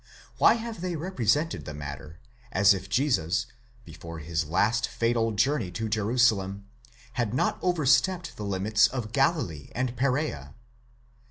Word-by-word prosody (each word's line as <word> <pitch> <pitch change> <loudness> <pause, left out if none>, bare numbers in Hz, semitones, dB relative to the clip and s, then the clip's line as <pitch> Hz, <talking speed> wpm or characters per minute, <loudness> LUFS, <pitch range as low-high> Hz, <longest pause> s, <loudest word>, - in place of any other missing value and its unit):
Why - - +6
have 230 -5 -6
they 180 -1 -2
represented 155 - 0
the 75 - -7
matter, 70 +1 -8 0.3
as 100 -1 +5
if 95 0 -6
Jesus, 120 - +1 0.4
before 85 +1 -9
his 80 0 -2
last 110 +8 +1
fatal 115 -1 0
journey 115 -1 +1
to 110 +4 -3
Jerusalem, 105 -3 +1 0.5
had 120 -2 -1
not - - 0
over 175 -5 0
stepped 170 +8 +2
the 105 - -7
limits 105 +2 +2
of 120 -2 -5
Galilee 135 - 0
and 125 +1 -1
Perea? 125 - -1
110 Hz, 140 wpm, -27 LUFS, 95-135 Hz, 0.5 s, Why